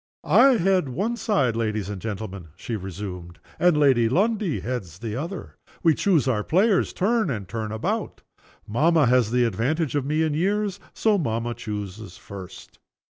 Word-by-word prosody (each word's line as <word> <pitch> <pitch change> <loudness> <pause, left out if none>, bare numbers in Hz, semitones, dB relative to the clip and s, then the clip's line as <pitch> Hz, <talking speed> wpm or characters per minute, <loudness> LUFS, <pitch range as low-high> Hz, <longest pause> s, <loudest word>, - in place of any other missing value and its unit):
"I 230 - +6
head 185 -5 +2
one 200 - -1
side, 145 - +1
ladies 110 -3 -1
and 100 -2 -6
gentlemen," 100 -5 -5
she 115 +5 -5
resumed. 90 -3 -7 0.2
"And 175 -3 +4
Lady 130 -6 +4
Lundie 205 - +1
heads 100 -10 -5
the 110 0 -5
other. 170 +8 -6 0.3
We 165 -2 +5
choose 160 -6 +2
our 110 -5 +1
players 190 - +2
turn 220 -1 +1
and 105 -8 -4
turn 110 -1 -4
about. 110 0 -3 0.4
Mamma 155 +7 +3
has 125 -2 +3
the 125 +1 +2
advantage 130 - -1
of 145 -2 0
me 155 +3 0
in 155 -2 0
years. 200 +4 0 0.2
So 215 -3 +2
mamma 115 -5 -1
chooses 105 -4 -6
first." 95 -2 -11
125 Hz, 160 wpm, -24 LUFS, 105-175 Hz, 0.4 s, I